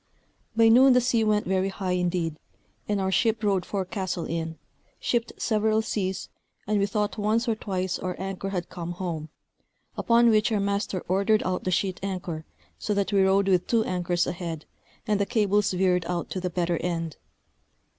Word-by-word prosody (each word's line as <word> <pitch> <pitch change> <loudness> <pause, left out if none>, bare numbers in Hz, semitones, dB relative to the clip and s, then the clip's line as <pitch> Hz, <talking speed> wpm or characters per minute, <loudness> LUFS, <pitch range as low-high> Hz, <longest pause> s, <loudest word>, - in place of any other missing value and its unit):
By 225 0 +6
noon 255 +3 +7
the 250 - +6
sea 240 -2 +2
went 210 -1 +2
very 190 +1 +1
high 190 -1 -3
indeed, 175 -3 -1 0.5
and 205 -1 +1
our 190 0 0
ship 225 +2 +1
rode 195 -3 +1
forecastle 185 -3 -3
in, 165 -1 -3 0.4
shipped 235 -1 0
several 220 0 +1
seas, 190 -4 -2 0.4
and 210 0 +1
we 200 - +2
thought 210 +1 -1
once 220 +4 +1
or 230 - +3
twice 190 -4 -3
our 180 -1 -3
anchor 195 0 -4
had 180 -3 -3
come 175 -1 -6
home; 170 -4 -4 0.7
upon 235 -1 +4
which 215 +1 +3
our 215 - +2
master 200 -2 -1
ordered 200 +4 +2
out 185 0 -2
the - - +1
sheet 185 0 0
anchor, 180 -5 -4 0.3
so 210 - -1
that 200 +1 0
we 195 - +4
rode 195 +1 +3
with 185 -2 +2
two 230 -2 +3
anchors 175 -2 0
ahead, 170 -3 -5 0.4
and 210 -3 +1
the 200 - +2
cables 210 -3 +2
veered 180 -2 +2
out 175 -1 -3
to 185 - -2
the 180 - -1
better 175 -1 0
end. 165 -3 -3
190 Hz, 180 wpm, -26 LUFS, 180-210 Hz, 0.7 s, noon